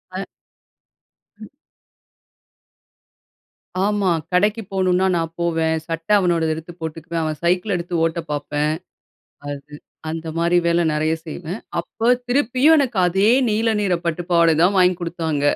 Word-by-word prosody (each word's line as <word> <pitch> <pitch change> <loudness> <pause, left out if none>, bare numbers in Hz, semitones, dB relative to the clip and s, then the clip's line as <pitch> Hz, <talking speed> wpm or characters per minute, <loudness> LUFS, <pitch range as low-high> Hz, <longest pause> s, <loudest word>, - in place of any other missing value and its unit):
ஆ. 195 - -3 1.2
ம். 215 - -9 2.3
ஆமா! 205 -2 +1 0.2
கடைக்கு 210 +5 +2
போணுன்னா 185 -1 +2
நான் 165 -1 -1
போவேன். 165 -1 +1
சட்டை 165 +4 -1
அவனோடது 170 -4 +1
எதுத்து 160 +2 -9
போட்டுக்குவேன். 165 +1 -4
அவன் 155 -1 -3
சைக்கிள 180 +3 +1
எடுத்து 175 0 -4
ஓட்ட 165 +1 0
பார்ப்பேன். 145 +1 -1 0.8
அது 145 +1 -7 0.4
அந்த 160 0 -5
மாதிரி 170 +1 +2
வேலை 170 0 +3
நிறைய 155 +1 +1
செய்வேன். 170 +5 -6 0.2
அப்போ 225 - -5 0.2
திருப்பியும் 260 +4 +4
எனக்கு 250 -7 0
அதே 195 +5 +3 0.2
நீல 220 +1 +1
நீற 190 -4 +1
பட்டுப்பாவாட 170 0 +2
தான் 195 +3 +3
வாங்கி 180 0 +5
குடுத்தாங்க. 165 -4 -2
175 Hz, 125 wpm, -21 LUFS, 160-195 Hz, 2.3 s, வாங்கி